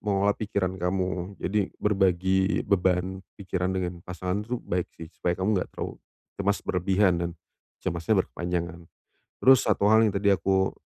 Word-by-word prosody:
mengelola 100 -1 +2
pikiran 100 -3 -1
kamu. 90 +1 -2
Jadi 100 0 0
berbagi 95 -1 +2
beban 95 -1 +1 0.2
pikiran 95 -2 -2
dengan 90 -2 -3
pasangan 90 +2 -3
itu 120 +3 -2
baik 90 0 -2
sih, 80 -1 -9
supaya 90 0 -1
kamu 100 +3 +1
enggak - - -5
terlalu - - -6 0.4
cemas 100 0 +1
berlebihan 95 +1 +2
dan 85 0 -1 0.5
cemasnya 95 +3 +1
berkepanjangan. 85 -1 -4 0.6
Terus 130 -1 +6
satu - - +2
hal 110 +1 +6
yang 105 - +1
tadi 100 +1 +3
aku, 95 0 +1
95 Hz, 150 wpm, -27 LUFS, 90-100 Hz, 0.6 s, Terus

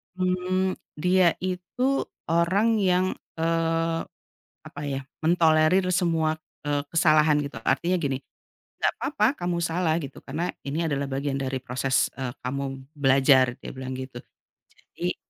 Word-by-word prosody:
mmm, 185 0 0 0.2
dia 180 +2 +3
itu 190 +9 -1 0.2
orang 195 +7 +3
yang, 185 -2 +3 0.3
eee, 165 0 0 0.7
apa 155 - -9
ya, 140 -2 -2 0.2
mentolerir 165 +2 +4
semua, 165 -3 +1 0.3
eee, 145 -1 0
kesalahan, 155 -2 +4
gitu. 140 -3 -4
Artinya 170 +7 +1
gini, 140 -7 -1 0.6
"Nggak - - +2
apa-apa 215 -8 +1 0.2
kamu 175 -1 0
salah, 170 -1 +1
gitu, 140 -4 -8
karena 160 +6 -3 0.2
ini 155 +4 -1
adalah 140 -2 -2
bagian 135 +1 -1
dari 135 -1 -2
proses, 130 +1 +1
eee, 130 -2 -3
kamu 140 +2 -2 0.3
belajar", 135 -1 +5
dia - - -8
bilang 130 0 -6
gitu. 130 -2 -7 0.8
Jadi - - -1
160 Hz, 130 wpm, -26 LUFS, 140-180 Hz, 0.8 s, belajar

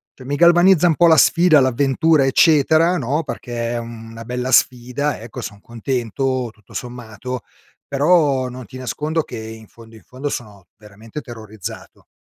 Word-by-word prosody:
cioè 130 - -13
mi 140 +2 -2
galvanizza 175 +1 +5
un 160 - +2
po' 175 - +4
la 160 -1 +6
sfida, 170 +1 +5
l'avventura, 135 +4 +2
eccetera, 160 +5 +4
no, 145 +3 -1
perché 120 -3 -4
è - - -2
una 115 -1 -9
bella 125 +1 -3
sfida, 125 +3 +1
ecco, 115 -1 -8
son 100 - -8
contento, 125 +2 -3
tutto 105 -3 -21
sommato, 125 0 -7 0.5
però 140 -2 +2
non 125 0 -9
ti 130 - -11
nascondo 150 +5 -2
che, - - -9
in 110 0 -10
fondo, 115 0 -16
in - - -19
fondo, 135 +3 -6
sono 105 -8 -7
veramente 105 +5 -10
terrorizzato 110 -3 -10
130 Hz, 155 wpm, -19 LUFS, 115-150 Hz, 0.5 s, la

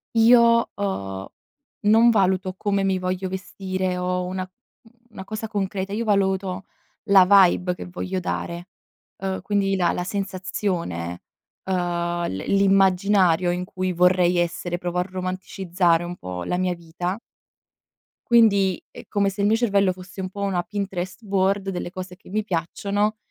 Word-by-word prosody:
Io 230 0 +5
ho 95 - -4 0.5
non 225 +3 +6
valuto 190 -3 +1
come 200 0 0
mi 190 -1 +1
voglio 185 +1 -2
vestire 185 -1 -3
o 180 0 -1
una, 185 +1 -3 0.4
mhmm, 225 0 -22 0.2
una, 210 -4 -9
cosa 215 +2 -5
concreta, 195 -2 -3
io 220 +3 -1
valuto 190 -2 0 0.4
la 200 -3 +7
vibe 185 -2 +5
che 180 - -8
voglio 185 +1 -4
dare, 175 0 -4 0.5
uhm, 190 0 -3
quindi 200 -1 0
la 175 -3 +2
la 180 - -2
sensazione, 185 - -3 0.4
uhm, 175 -2 -1
l 95 - -4
l'immaginario 195 -2 +3
in 180 +1 -1
cui 185 0 -3
vorrei 180 0 +3
essere, 175 0 -1
provo 175 0 -3
a 180 - 0
romanticizzare 185 -2 0
un 175 +1 -5
po' 90 - -6
la 180 - -1
mia 185 -1 0
vita 175 +4 -4 1.1
quindi, 200 -6 +4
è - - -12
come 200 -1 +1
se 195 +1 -5
il 200 - +3
mio 220 +2 +3
cervello 200 -5 +2
fosse 185 +1 -9
un 185 - -4
po' 200 +2 -8
una 190 -3 0
Pinterest 195 0 -5
board 195 0 +1
delle 180 -2 -4
cose 185 -1 -7
che 185 - -18
mi 215 +3 -1
piacciono, 200 +3 -1
185 Hz, 150 wpm, -23 LUFS, 180-200 Hz, 1.1 s, la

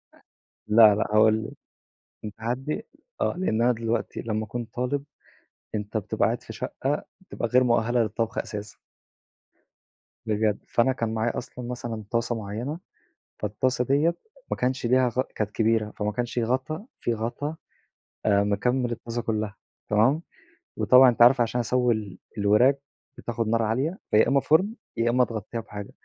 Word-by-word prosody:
أ - - -22 0.5
لأ 105 -1 +7
لأ 105 - 0
هاقول 110 +1 +5
لِك - - -7 0.7
كان 105 - -6
تحدي 125 +6 -3 0.3
آه، - - +1
لإن 115 -12 +1
أنا 125 +1 +4
دلوقتي 115 0 -2
لمّا 110 -1 -2
اكون 120 +3 -4
طالب، 125 +5 -3 0.7
أنت 105 +1 -3
بتبقى 105 - 0
قاعد - - 0
في - - -9
شقة 145 +3 -3 0.2
بتبقى 185 -10 -4
غير 125 +2 +4
مؤهلة 120 0 +2
للطبخ 110 +1 -2
أساسًا. 105 -1 -5 1.5
بجد، 105 -1 +1
فأنا 120 +3 +3
كان 115 -3 -2
معايا 110 +1 -1
أصلًا 125 0 -6
مثلًا 120 -3 -5
طاسة 115 0 0
معيّنة، 115 +9 -4 0.6
فالطاسة 125 +5 0
دِيّة 150 +6 +2 0.4
ما - - 0
كانش 125 0 -1
ليها 130 +1 +4
غ 125 +2 0
كانت 105 -1 -2
كبيرة، 110 -1 +1
فما 105 0 -2
كانش 120 +3 -2
غطا 130 - -2
في 120 - 0
غطا 120 +7 -3 0.7
آآ 100 -1 +4
مكمّل 120 +5 0
الطاسة 120 +1 -4
كلّها، 110 -3 -2 0.3
تمام، 120 +9 +3 0.6
وطبعًا 130 +1 +7
أنتِ 120 0 +2
عارفة 125 +1 +7
عشان 120 +1 -1
اسوّي 125 +1 +2
ال 105 -4 -6 0.2
الوراك 105 +7 +4 0.4
بتاخد 115 -1 -3
نار 115 +1 +2
عالية، 130 - -1
فيا 105 - +5
إمّا 140 0 +4
فرن، 185 +10 +3 0.2
يا 115 +1 +2
إمّا 125 +1 +4
تغطّيها 115 0 -5
بحاجة، 105 -2 -8
115 Hz, 155 wpm, -26 LUFS, 110-125 Hz, 1.5 s, لأ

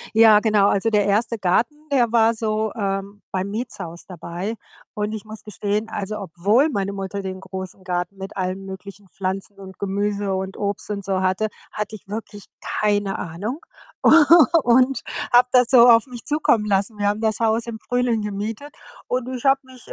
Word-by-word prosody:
Ja, 220 -2 +7
genau. 210 -2 +3
Also, 200 +3 +1
der 210 -2 +3
1. 220 +3 +1
Garten, 205 +10 +1 0.2
der 240 -4 +3
war 230 0 +4
so, 220 -1 -1
ähm, 200 -1 -3
beim 190 +1 -2
Mietshaus 200 -7 -6
dabei. 180 +3 -5 0.4
Und 210 0 -2
ich 220 0 -6
muss 215 0 -10
gestehen, 210 +1 -3
also, 210 0 -4
obwohl 205 - +1
meine 200 -4 -2
Mutter 195 0 -5
den 190 -1 -6
großen 190 -1 -8
Garten 180 +1 -3
mit 195 0 -8
allen 185 0 -3
möglichen 195 +1 -10
Pflanzen 190 +1 -5
und 190 -1 -11
Gemüse 200 0 -1
und 190 +1 -4
Obst 205 0 -3
und 200 -1 -4
so 190 -1 -1
hatte, 185 +3 0 0.2
hatte 210 0 -4
ich 200 - -20
wirklich 205 -1 -7 0.4
keine 205 -2 +1
Ahnung 200 - -5 0.5
u - - +8 0.5
und 255 +2 +3 0.3
habe 245 +1 +6
das 250 -2 +5
so 245 -2 +8
auf 230 0 +6
mich 245 -2 -9
zukommen 285 -7 +2
lassen. 200 +2 0
Wir 205 0 +1
haben 210 +1 -1
das 220 -1 0
Haus 225 +1 +1
im 230 -1 -6
Frühling 245 -3 0
gemietet 210 +7 -5 0.4
und 250 0 -2
ich 245 - -7
habe 270 0 +5
mich 260 -2 -16
äh, - - -7
205 Hz, 185 wpm, -22 LUFS, 195-225 Hz, 0.5 s, u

